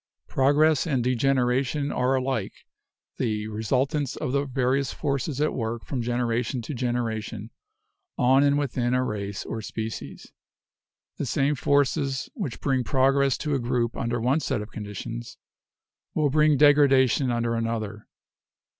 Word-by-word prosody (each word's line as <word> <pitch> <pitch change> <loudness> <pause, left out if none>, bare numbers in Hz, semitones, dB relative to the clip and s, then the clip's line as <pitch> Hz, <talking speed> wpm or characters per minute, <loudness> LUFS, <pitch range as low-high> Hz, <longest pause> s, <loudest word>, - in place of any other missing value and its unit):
Progress 145 +3 +3
and 130 -6 +1
degen 130 +2 +2
eration 130 +3 0
are 130 +1 +2
alike 130 -6 -3 0.5
the 110 -4 -1
resultants 130 +6 -1
of - - -3
the 140 +1 +1
various 130 0 0
forces 140 -1 -2
at 150 +1 +1
work 115 -1 -3
from 130 -4 -3
generation 120 +1 -1
to 150 - -5
generation 115 -3 -3 0.7
on 130 +1 +4
and 140 0 +3
within 125 -3 0
a 130 - +2
race 100 -4 -4
or 115 - -4
species. 110 +1 -6 0.9
The 140 - -3
same 140 +3 +1
forces 140 -1 0
which 180 - -5
bring 135 -3 +1
progress 135 +1 +2
to 150 - 0
a 140 - +1
group 120 -1 -1
under 120 0 -2
one 130 +6 +2
set 135 -5 -1
of 105 +1 -7
conditions 105 - -7 0.8
will 150 -3 +2
bring 150 0 +4
degradation 135 -3 +5
under 120 -1 0
another. 115 -2 -3
130 Hz, 140 wpm, -25 LUFS, 115-140 Hz, 0.9 s, degradation